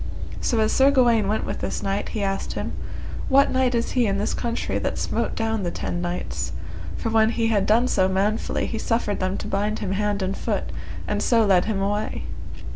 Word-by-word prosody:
So 230 - +1
as 215 - +2
Sir 270 +1 +5
Gawaine 240 -6 +4
went 215 +2 0
with - - -4
this - - -3
knight 195 +1 -1
he 215 - -2
asked 195 0 -1
him, - - -3 0.6
What 275 +1 +5
knight 260 -1 +2
is 235 0 0
he 245 -3 +2
in 195 -1 +1
this 210 +2 -1
country 235 -1 -1
that - - -2
smote - - -1
down 225 -1 0
the 180 - -1
ten 175 0 -3
knights? 175 0 -3 0.4
For 225 - -2
when 220 0 +4
he 230 -1 +1
had 205 -3 +2
done 230 +4 +4
so 185 -6 +3
manfully 195 +3 0
he 225 - -3
suffered 230 -3 0
them 185 +1 -1
to - - -5
bind 210 +2 0
him 190 - -3
hand 205 0 0
and 190 +1 -1
foot, - - -2 0.4
and - - 0
so 230 -2 +4
led 185 -3 +4
him 210 -2 -1
away. 205 +2 -1
215 Hz, 210 wpm, -24 LUFS, 195-230 Hz, 0.6 s, Sir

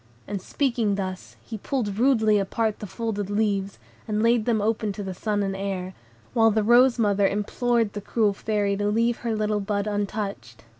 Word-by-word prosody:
And 200 -1 -4
speaking 235 -4 0
thus, 185 -2 -5
he 220 -2 -7
pulled 210 -4 -2
rudely 220 -5 +4
apart 215 +2 -1
the 210 - -6
folded 205 -1 -3
leaves, 205 -2 0 0.3
and 215 0 0
laid 230 -1 +3
them 230 -3 +2
open 215 0 0
to 205 - -6
the 190 -1 -4
sun 205 +2 -1
and 195 -1 -2
air; 190 -1 -4 0.4
while 225 -1 +5
the 220 0 +1
rose 245 +3 +5
mother 205 -3 +3
implored 225 +2 0
the 205 - -5
cruel 210 0 +1
Fairy 205 -1 -1
to 205 0 0
leave 230 +3 +1
her 230 -2 -2
little 210 -1 0
bud 200 0 -1
untouched. 205 - -4
210 Hz, 185 wpm, -25 LUFS, 200-225 Hz, 0.4 s, while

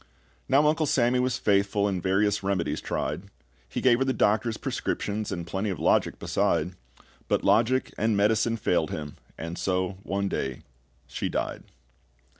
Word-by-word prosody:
Now 140 +3 +5
Uncle 155 0 +2
Sammy 125 -1 +3
was 125 0 +1
faithful, 100 0 +2
And 95 -3 -1
various 100 +2 +2
remedies 95 -3 -1
tried; 95 - -3 0.4
He - - -3
gave 120 -2 +4
her - - +3
the 135 0 0
doctor's 110 +1 +1
prescriptions, 105 +1 -3
And 85 -3 -4
plenty 95 +4 -2
of 95 - -3
logic - - +2
beside; 85 +1 0 0.6
But - - +1
logic 115 +6 +2
and 110 -1 +2
medicine 110 +3 +2
failed 85 -7 +1
him, 75 -1 -6 0.2
and 85 +2 -5
so 95 0 -1
one 100 0 -2
day 65 -8 -3 0.4
she - - -3
died. - - -3
100 Hz, 155 wpm, -27 LUFS, 95-115 Hz, 0.6 s, Now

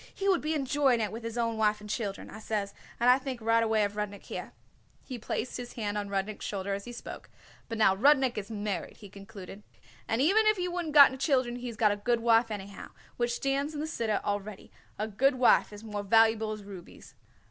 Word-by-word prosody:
'He 395 - -4
would 375 -3 +3
be 310 +1 -1
enjoying 265 -6 +1
with 225 +1 -7
his 230 +1 -5
own 230 -1 -1
wife 215 -1 +2
and 210 - -11
children,' 205 -2 -4
I - - -9
says, 210 -2 -3 0.3
and 240 - +2
I 250 +1 +6
thinks 260 -4 -6
right 230 +1 +3
away 220 -1 +2
of 205 0 -2
Rudnik 205 -1 -4
here." - - -7 0.5
He 255 -3 -7
placed 225 +2 -4
his 245 -1 -7
hand 210 -3 -3
on 205 -1 -3
Rudnik's 200 +1 -3
shoulder 200 -1 -3
as 200 0 -5
he 245 - -7
spoke. 235 - -9 0.4
"But 230 - -4
now 195 -3 +4
Rudnik 265 +2 +4
is 205 0 -5
married," 205 -5 -4
he 205 - -12
concluded, 195 0 -11 0.5
"and 225 - 0
even 400 +10 +4
if 430 -1 +4
he 360 0 -1
wouldn't 350 -4 -4
got 275 -2 +8
children 255 -4 +1
he's 240 -2 -7
got 215 -2 +4
a 205 - -2
good 235 +3 0
wife 230 0 +4
anyhow, 200 -2 -7 0.3
which 240 0 0
it - - -1
stands 275 +3 -1
in - - -4
the 305 - -2
Siddur 230 -9 -1
already 205 0 -4 0.3
a 215 - -2
good 260 +6 +2
wife 250 -4 +4
is 210 +1 -11
more 210 -2 -4
valuable 220 +1 +3
as 215 -1 -6
rubies." 195 -3 -12
225 Hz, 225 wpm, -29 LUFS, 205-255 Hz, 0.5 s, got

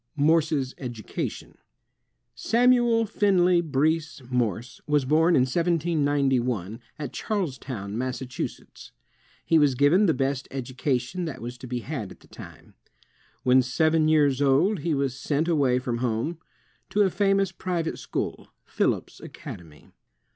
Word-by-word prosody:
Morse's 150 -3 +2
Education 120 -5 -6 0.7
Samuel 240 - +3
Finley 185 -4 +3
Breese 155 -1 -1
Morse 120 -1 -2
was 150 -2 +2
born 160 +5 +3
in - - +5
1791, 140 - 0 0.2
at 150 -2 -6
Charlestown, 130 - -4
Massachusetts. 130 +1 -5 0.5
He 165 - +4
was 145 -3 +3
given 160 +10 +4
the 160 - +2
best 135 0 -1
education 130 +4 -2
that 160 - -6
was 120 +1 -6
to 125 - -9
be 125 0 -3
had 125 -7 -5
at - - -14
the - - -19
time. - - -13 0.7
When 130 +1 +5
seven 155 +5 +2
years 145 -3 +3
old 145 +9 +3
he 160 +1 -1
was 135 -2 -1
sent 150 +4 -1
away 140 -7 +2
from 125 -2 -3
home, 125 +7 -2 0.5
to 210 - +3
a 190 - +1
famous 195 0 +2
pri 180 -2 -2
vate 160 - -4
school, - - -4 0.2
Phillips - - -1
Academy. 80 -4 -11
145 Hz, 135 wpm, -25 LUFS, 125-170 Hz, 0.7 s, in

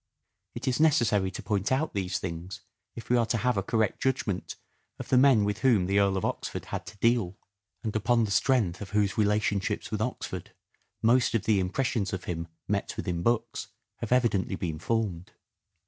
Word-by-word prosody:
It 125 +3 -5
is 130 +1 +1
necessary 120 -11 +3
to - - -8
point 100 0 -1
out 140 +5 +1
these 95 -2 -1
things 85 +1 -6 0.3
if 115 - -8
we 125 - +5
are 120 - +3
to 115 - +1
have 125 +3 +1
a 100 - +1
correct 110 +1 0
judgment 115 -7 -1 0.4
of - - -8
the 130 - +4
men 130 -5 +6
with 105 +1 -1
whom 115 -8 +3
the 100 +2 +2
Earl 100 -1 +2
of 95 - -1
Oxford - - -3
had - - -5
to 105 - -10
deal, 110 -4 +1 0.5
and 110 -1 -3
upon 115 +2 +2
the 105 - -2
strength 105 -7 +2
of 100 - -6
whose 100 -2 +2
relation 105 -1 +2
ships 95 - -3
with - - -2
Oxford - - -4 0.5
most 120 +1 +4
of 115 - +1
the 105 -2 +3
impressions 100 +2 -1
of 95 - -3
him 85 -1 -4 0.2
met - - -2
with - - -4
in 85 -1 -1
books 115 +4 0 0.3
have 115 - -6
evidently 120 -6 +2
been 80 -4 -4
formed. 100 -6 -2
105 Hz, 195 wpm, -28 LUFS, 95-120 Hz, 0.5 s, men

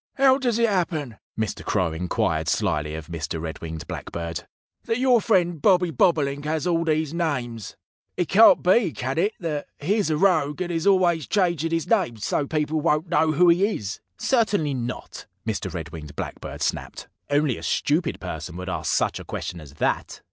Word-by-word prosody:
"How 270 0 +5
does 245 -4 +1
it 235 0 +3
happen," 160 - -1 0.2
Mr. 110 -2 -2
Crow 90 -6 0
inquired 80 -2 -1
slyly 75 0 0
of 80 -1 -6
Mr. 80 -1 -4
Red 80 0 -6
winged 80 0 -6
Blackbird, 85 0 -5 0.4
"that 225 -1 0
your 250 -2 +4
friend 175 -7 +2
Bobby 180 0 +4
Bobolink 145 -2 +2
has 155 -1 -1
all 170 -2 +2
these 155 -1 0
names? 130 - -3 0.4
It 175 - 0
can't 200 -1 +6
be 185 -1 +3
can 130 +5 -2
it 205 +5 +2
that 150 -4 -3
he 195 +9 +1
is 205 -6 +1
a 155 - +1
rogue 155 -5 +2
and 180 -1 -2
is 165 +2 -1
always 175 -6 +3
changing 170 -6 +1
his 165 -1 -1
name 185 - +1
so 140 +6 -1
people 155 0 0
won't 160 +1 +1
know 155 -1 +3
who 175 +4 +4
he 175 +3 +4
is?" 105 0 -5 0.2
"Certainly 205 - +1
not!" 125 -1 -5 0.2
Mr. - - -2
Red - - -6
winged 75 -2 -9
Blackbird - - -5
snapped. - - -3 0.2
"Only 145 -3 +2
a - - -9
stupid 155 +3 0
person 85 -1 -6
would 90 +1 -5
ask - - -2
such - - +1
a - - -8
question 85 -2 -5
as 70 -2 -13
that." - - -1
155 Hz, 185 wpm, -24 LUFS, 110-180 Hz, 0.4 s, can't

